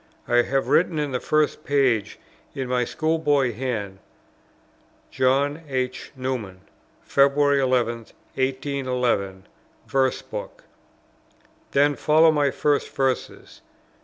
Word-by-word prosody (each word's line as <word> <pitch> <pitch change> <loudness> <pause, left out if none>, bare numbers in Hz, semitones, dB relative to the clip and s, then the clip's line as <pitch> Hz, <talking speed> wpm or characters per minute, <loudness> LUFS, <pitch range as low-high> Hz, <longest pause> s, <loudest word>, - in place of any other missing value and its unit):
I 120 - +2
have 135 +3 +1
written 170 -1 +2
in 150 -2 -1
the 125 - -1
first 155 +1 0
page, 130 -7 +1 0.4
in 135 -1 -3
my 125 -1 0
school 160 +4 -1
boy 145 -5 +2
hand, 105 -5 -4 1.1
"John. 140 +4 +1
H. 130 -1 -3
Newman, 125 -8 -4 0.4
February 140 0 +3
11th, 120 -3 0 0.2
1811, 130 -7 -1 0.4
Verse 135 -1 0
Book;" - - -8 1.1
then 145 +1 +3
follow 160 +3 +4
my 145 -2 +2
first 145 +2 0
Verses. 135 -2 -3
135 Hz, 105 wpm, -23 LUFS, 125-145 Hz, 1.1 s, follow